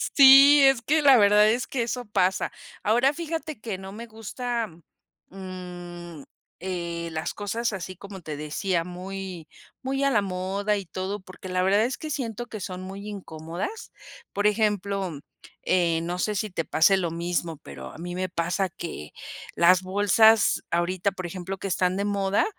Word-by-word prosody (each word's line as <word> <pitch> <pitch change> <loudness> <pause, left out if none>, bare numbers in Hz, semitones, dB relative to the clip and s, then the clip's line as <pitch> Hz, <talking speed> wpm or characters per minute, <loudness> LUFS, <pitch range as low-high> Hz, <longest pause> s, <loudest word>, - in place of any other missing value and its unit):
Sí, 275 +1 +9
es 270 -3 +5
que 305 +5 +2
la 275 -3 +7
verdad 210 0 +6
es 240 +3 0
que 250 -3 -1
eso 245 +1 -3
pasa, 190 -3 +1 0.3
ahora, 245 +6 +3
fíjate 320 -4 -5
que 215 -5 -4
no 190 0 -9
me 230 +4 -8
gusta, 230 +1 -4 0.6
mm, 175 -4 -9 0.4
eh, 170 -2 -3
las 160 0 -3
cosas 225 +3 -2
así, 185 -1 -5
como 195 +1 -10
te 155 -3 -6
decía, 170 +4 -1
muy, 180 -1 -7 0.3
muy 270 +1 -1
a 275 - +3
la 210 - +3
moda 195 +2 -1
y 200 - -5
todo 185 +5 -4
porque 185 0 -11
la 185 0 +1
verdad 200 +3 +4
es 255 - -3
que 310 - -6
siento 240 -4 -3
que 215 - -7
son 185 -1 -6
muy 195 +2 -8
incómodas, 185 - -6 0.4
por 205 +1 -1
ejemplo, 200 -6 0 0.4
eh, 170 -3 +2
no 175 +2 -3
sé 210 +2 0
si 210 +1 -2
te 165 -2 -2
pase 195 +5 +4
lo 175 -3 -1
mismo, 170 -1 -2
pero 70 - -10
a - - -12
mí 175 +2 -6
me 185 0 -2
pasa 175 +3 -1
que 170 - -7 0.4
las 180 +1 +5
bolsas 205 +3 +4
ahorita, 175 +3 0
por 185 -1 -7
ejemplo, 185 +2 -5
que 195 - -5
están 180 0 +1
de 200 - -1
moda, 200 -1 +1
195 Hz, 175 wpm, -26 LUFS, 175-215 Hz, 0.6 s, Sí